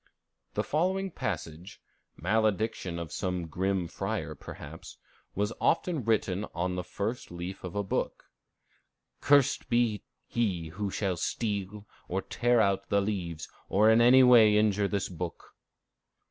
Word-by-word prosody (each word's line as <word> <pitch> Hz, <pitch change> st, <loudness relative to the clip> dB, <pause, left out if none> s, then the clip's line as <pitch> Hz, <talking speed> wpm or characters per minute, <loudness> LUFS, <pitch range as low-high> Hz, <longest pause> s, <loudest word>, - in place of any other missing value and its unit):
The -, -, +1 dB
following 190 Hz, +5 st, 0 dB
passage, 85 Hz, -, -5 dB, 0.4 s
malediction 105 Hz, -2 st, 0 dB
of 85 Hz, -2 st, -6 dB
some 90 Hz, +2 st, -2 dB
grim 95 Hz, +2 st, -1 dB
friar -, -, -3 dB
perhaps, -, -, -10 dB, 0.4 s
was 105 Hz, +3 st, 0 dB
often 165 Hz, -4 st, +1 dB
written 105 Hz, -3 st, +1 dB
on 90 Hz, +2 st, -1 dB
the 90 Hz, 0 st, -3 dB
first 105 Hz, +7 st, -4 dB
leaf 90 Hz, +2 st, -7 dB
of 90 Hz, 0 st, -6 dB
a 100 Hz, -, 0 dB
book: 95 Hz, -, -2 dB, 1.0 s
"Cursed 140 Hz, -3 st, +3 dB
be 120 Hz, -4 st, +2 dB, 0.2 s
he 95 Hz, -9 st, -1 dB
who 100 Hz, +5 st, -3 dB
shall 95 Hz, -2 st, -1 dB
steal 105 Hz, +1 st, -3 dB, 0.2 s
or 95 Hz, +2 st, -2 dB
tear 120 Hz, 0 st, +2 dB
out 100 Hz, -3 st, +1 dB
the 100 Hz, -, +3 dB
leaves, 90 Hz, -6 st, -3 dB, 0.2 s
or 105 Hz, +3 st, +5 dB
in 115 Hz, +1 st, +5 dB
any 130 Hz, +2 st, +7 dB
way 115 Hz, -4 st, +7 dB
injure 105 Hz, -1 st, +2 dB
this 100 Hz, -1 st, -1 dB
book." 90 Hz, -1 st, -7 dB
100 Hz, 135 wpm, -29 LUFS, 90-110 Hz, 1.0 s, any